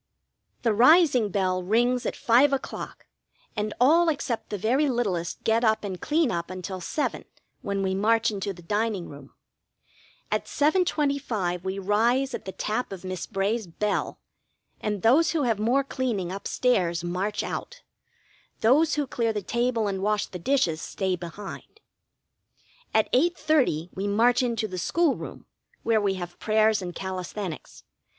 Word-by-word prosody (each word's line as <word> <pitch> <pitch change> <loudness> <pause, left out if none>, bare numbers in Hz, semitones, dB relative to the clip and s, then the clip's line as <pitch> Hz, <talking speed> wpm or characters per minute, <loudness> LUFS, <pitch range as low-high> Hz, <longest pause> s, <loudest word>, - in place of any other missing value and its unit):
The 230 -3 +3
rising 255 - +5
bell 185 -2 0
rings 240 +6 +1
at - - -3
five 260 +5 +4
o'clock, 270 - -5 0.5
and 210 0 -2
all 325 +7 +5
except 275 -6 -2
the 205 - -3
very 255 +9 +2
littlest 195 -10 -2
get 225 +2 +2
up 220 -1 +2
and 190 -3 -5
clean 305 -4 +1
up 170 -1 -3
until 185 0 -6
seven, 290 - -2 0.4
when 200 -5 -2
we 190 0 0
march 225 +3 +2
into 200 -1 -3
the 175 -2 -12
dining 205 0 -1
room. 140 -1 -13 1.0
At - - 0
7.25 280 - 0
we 190 +1 -3
rise 235 +7 +1
at - - -5
the 190 - -4
tap 215 +5 -3
of 190 -2 -7
Miss 185 -2 -5
Bray's 205 +1 -1
bell, 205 +5 -2 0.6
and 210 -3 -3
those 285 +10 +4
who 315 -3 +1
have 230 -5 +1
more 245 +6 +2
cleaning 235 -10 -2
up 195 +1 -5
stairs 175 -9 +1
march 185 +4 -2
out; - - -6 0.8
those 295 +8 +4
who 295 -1 0
clear 230 -3 -1
the 210 -2 -3
table 235 0 0
and 190 -1 -2
wash 210 +1 +1
the 180 - -8
dishes 175 - +1
stay 190 -2 -2
behind. 185 - -9 1.1
At 220 - +1
8.30 270 - +2
we 195 +2 -3
march 235 +5 +3
into 230 -3 -1
the 185 -2 -5
school 335 - +2
room, - - -9 0.4
where 225 -2 +2
we 195 -2 +1
have 175 -1 -7
prayers 215 -1 +3
and 175 -1 -6
calisthenics. 185 -1 -6
215 Hz, 155 wpm, -26 LUFS, 190-250 Hz, 1.1 s, rising